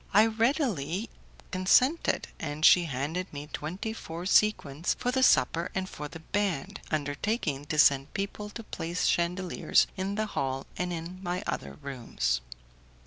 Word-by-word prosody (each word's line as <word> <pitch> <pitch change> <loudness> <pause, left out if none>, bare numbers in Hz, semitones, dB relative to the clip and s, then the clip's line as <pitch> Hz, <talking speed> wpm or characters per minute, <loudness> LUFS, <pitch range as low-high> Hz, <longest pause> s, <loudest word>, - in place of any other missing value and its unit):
I 210 +2 +8
readily 225 - 0 0.4
consented, 250 - +3
and 150 0 -1
she 175 -1 +7
handed 155 +6 -3
me 145 0 -6
twenty 185 +8 -4
four 170 -5 -7
sequins 175 -7 +2
for 250 - -1
the 260 +1 +1
supper 170 -8 +4
and 190 -1 -1
for 150 -5 -6
the 160 +2 -10
band, 195 -4 -2
undertaking 145 - -1
to 155 - -3
send 140 -2 +5
people 205 +1 -3
to 230 +2 -8
place 170 -3 -3
chandeliers 180 +1 +2
in 195 +1 -2
the 215 +1 0
hall 135 -9 -2
and 180 0 -2
in 170 +2 -5
my 180 -1 -2
other 70 0 -3
rooms. 120 - -1
175 Hz, 145 wpm, -29 LUFS, 145-205 Hz, 0.4 s, I